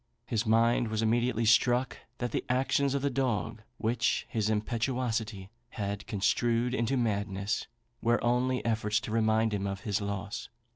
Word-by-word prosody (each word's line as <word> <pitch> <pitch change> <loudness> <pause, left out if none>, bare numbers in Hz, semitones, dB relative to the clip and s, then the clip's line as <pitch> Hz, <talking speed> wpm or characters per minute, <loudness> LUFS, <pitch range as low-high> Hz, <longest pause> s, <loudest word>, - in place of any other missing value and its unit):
His 110 -3 -1
mind 115 +2 +3
was 110 0 -1
immediately 115 +1 +1
struck 120 +3 +3 0.2
that 120 -2 -3
the - - -1
actions 135 +2 +2
of 140 - -1
the 140 - +1
dog, 120 -4 -1 0.2
which 115 +3 0
his 110 -2 -1
impetuosity 110 -2 -1 0.2
had 100 -1 -4
construed 115 +4 +1
into 130 +1 0
madness, 100 -3 -1 0.3
were 120 0 +2
only 125 +2 +1
efforts 110 -2 +1
to 110 - -6
remind 110 0 +2
him 100 -1 -1
of 100 0 -4
his 105 0 -1
loss. 100 0 -4
115 Hz, 150 wpm, -30 LUFS, 105-120 Hz, 0.3 s, mind